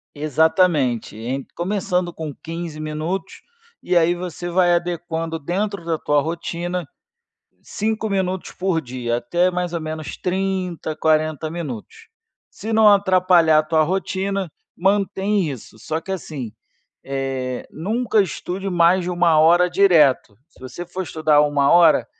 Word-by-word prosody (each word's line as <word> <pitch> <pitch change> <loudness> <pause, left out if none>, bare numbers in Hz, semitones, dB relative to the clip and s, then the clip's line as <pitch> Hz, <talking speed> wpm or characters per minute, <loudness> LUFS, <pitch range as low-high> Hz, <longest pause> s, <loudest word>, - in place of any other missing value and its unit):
Exatamente, 150 - +1
em 130 +4 -4
começando 180 -1 -1
com 155 -2 -6
15 165 -1 -7
minutos, 155 +5 -4 0.4
e 180 - 0
aí 170 +1 +4
você 175 0 -6
vai 175 0 +3
adequando 165 -1 -2
dentro 190 +4 -3
da 165 -1 0
tua 145 0 +2
rotina 170 +1 -4 0.8
5 220 +1 -2
minutos 190 -1 -2
por 180 -3 -1
dia, 120 -2 -3
até 175 +10 +1
mais 180 -1 -3
ou 170 - -2
menos 155 -1 -6
30, 185 -3 -2
40 155 0 +1
minutos. 165 - -7 0.4
Se 220 - -7
não 220 -1 +6
atrapalhar 185 -5 +4
a - - -3
tua 155 0 +2
rotina, 190 +2 -2 0.3
mantém 195 -1 +1
isso, 120 -4 -10
só 155 +8 -3
que 190 - -5
assim, 145 - -6 0.5
eh, 135 -2 -3
nunca 215 +6 0
estude 190 +2 -5
mais 175 +1 +4
de 180 - -2
1 175 -3 +3
hora 175 +3 +5
direto, 160 - +4
se - - -25
você 130 +7 -7
for 185 +2 -5
estudar 155 -3 +2
1 145 -1 +2
hora, 160 -8 +5
170 Hz, 140 wpm, -21 LUFS, 155-185 Hz, 0.8 s, não